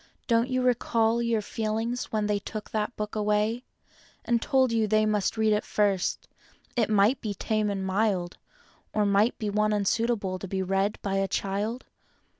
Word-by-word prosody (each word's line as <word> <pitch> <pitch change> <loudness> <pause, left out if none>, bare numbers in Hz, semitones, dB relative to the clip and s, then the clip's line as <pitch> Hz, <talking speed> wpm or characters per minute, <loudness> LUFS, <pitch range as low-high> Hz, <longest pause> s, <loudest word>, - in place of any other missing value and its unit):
Don't 235 +1 +2
you 255 0 0
recall 235 -2 +2
your 230 -2 0
feelings 225 +3 -2
when 215 -1 -1
they 205 -1 0
took 215 +1 -7
that 215 +2 -2
book 210 0 -4
away 210 +3 0 0.6
And 235 -1 +1
told 260 -2 +2
you 225 -2 +1
they 215 +1 +3
must 210 0 0
read 220 -1 +3
it 210 - +1
first— 200 -3 0 0.5
it 230 -4 +1
might 215 +4 +3
be 210 -2 -3
tame 215 +1 0
and 195 -1 -2
mild 190 -2 0 0.6
Or 210 -1 +2
might 200 +4 +3
be 210 -3 -2
one 215 +1 +2
unsuitable 205 -2 0
to 195 - -6
be 190 0 -2
read 195 +2 0
by 195 -1 -1
a 195 0 +1
child? 205 +6 -2
215 Hz, 175 wpm, -27 LUFS, 200-230 Hz, 0.6 s, they